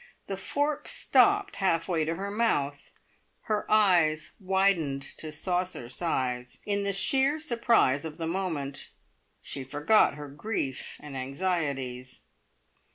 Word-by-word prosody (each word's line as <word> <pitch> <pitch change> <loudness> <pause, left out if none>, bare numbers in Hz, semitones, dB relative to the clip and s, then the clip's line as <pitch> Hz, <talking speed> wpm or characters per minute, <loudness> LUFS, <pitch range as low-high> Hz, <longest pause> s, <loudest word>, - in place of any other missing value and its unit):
The 195 - -4
fork 290 +10 -2
stopped 405 0 +3
half 165 -4 +1
way 165 -4 +1
to 165 +2 -1
her 200 +3 -4
mouth; 145 -11 0 0.5
her 210 -1 -2
eyes 175 -8 +4
widened 190 -8 +1 0.2
to 155 - -5
saucer 180 -5 -2
size. 125 -4 -2
In 200 -1 0
the 200 - 0
sheer 270 +9 +3
surprise 235 - +2
of 160 -2 -6
the 165 - -3
moment 160 -6 -3 0.5
she 135 - -4
forgot 145 +8 +3
her 145 0 -7
grief 145 -2 -4
and 145 -2 -9
anxieties. 135 -3 -3
165 Hz, 125 wpm, -28 LUFS, 140-200 Hz, 0.5 s, eyes